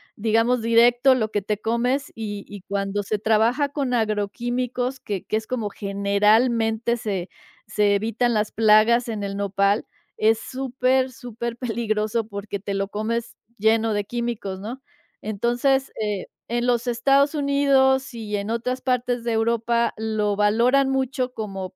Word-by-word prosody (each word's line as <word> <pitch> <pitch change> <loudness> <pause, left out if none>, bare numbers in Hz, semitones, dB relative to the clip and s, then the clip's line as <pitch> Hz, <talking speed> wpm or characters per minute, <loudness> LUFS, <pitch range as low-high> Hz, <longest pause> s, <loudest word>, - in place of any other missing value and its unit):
digamos 225 +3 +2
directo 240 +3 +5
lo 220 -3 -1
que 205 - 0
te 210 +1 -2
comes, 245 +5 -1
y 205 -2 -6
y 205 -2 -9
cuando 200 0 -1
se 215 +2 -1
trabaja 225 +7 +2
con 275 -4 -1
agroquímicos 240 +4 -1
que 200 -3 -4
que - - -2
es 220 - -6
como 230 -5 -2
generalmente 220 +4 +1
se 195 -5 -3 0.4
se 210 -1 +2
evitan 225 +3 0
las 210 0 0
plagas 225 +2 +4
en 210 -2 -3
el 200 0 -4
Nopal, 200 +1 +1 0.3
es 220 +1 +3
súper, 260 0 0
súper 235 -1 -6
peligroso 225 -2 -1
porque 200 -1 -5
te 200 0 -4
lo 195 0 -2
comes 225 +3 -3 0.2
lleno 220 +1 +2
de 205 0 0
químicos, 235 -5 -4
¿no?, 240 +6 -7 0.4
entonces, 240 +6 0
eh, 210 -3 -2 0.2
en 240 +1 -1
los 245 0 +1
Estados 275 +5 +3
Unidos 275 -2 +2
y 210 -3 -4
en 200 +2 -4
otras 250 +3 -2
partes 250 -2 -1
de 235 - 0
Europa 235 +1 +1
lo 215 -2 -1
valoran 240 +6 +3
mucho 265 -1 -1
como 195 -5 -6
225 Hz, 150 wpm, -23 LUFS, 210-245 Hz, 0.4 s, directo